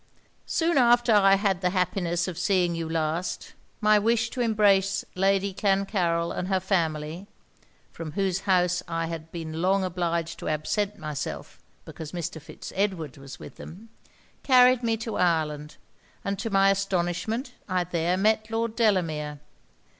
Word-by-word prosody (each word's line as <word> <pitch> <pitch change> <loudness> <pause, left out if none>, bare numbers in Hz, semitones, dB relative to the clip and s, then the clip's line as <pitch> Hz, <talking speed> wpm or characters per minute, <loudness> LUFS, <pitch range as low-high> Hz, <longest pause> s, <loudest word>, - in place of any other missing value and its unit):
'Soon 330 -3 +2
after 240 -1 +4
I 195 -2 +6
had 195 -2 0
the 180 - +2
happiness 180 -2 0
of 185 - -4
seeing 180 0 +1
you 165 -1 -4
last, 160 +2 -2 0.3
my 215 0 +5
wish 230 +2 +1
to 255 - -3
embrace 200 -4 +2
Lady 195 +1 +1
Clancarryl 190 -4 0
and 180 - -3
her 190 -1 +1
family 170 -1 -2 0.6
(from 160 -2 -7
whose 195 -2 0
house 180 -1 +3
I 165 -1 -2
had 165 -1 -6
been 160 -1 -5
long 190 +2 +2
obliged 170 -2 -2
to - - -6
absent 195 +7 -1
myself 150 -2 -6 0.3
because 160 0 -9
Mr. 165 -2 -4
Fitz 155 +1 -10
Edward 185 -9 -1
was 135 -1 -10
with - - -11
them) 210 +7 -11 0.5
carried 255 -1 +5
me 225 -2 0
to 225 0 -4
Ireland; 155 -4 0 0.5
and 200 -1 -2
to 225 - -3
my 195 -1 +4
astonishment 195 +5 -1 0.2
I 185 -1 +1
there 175 +1 0
met 215 +2 +2
Lord 225 0 -2
Delamere. 160 -10 0
185 Hz, 150 wpm, -26 LUFS, 165-205 Hz, 0.6 s, I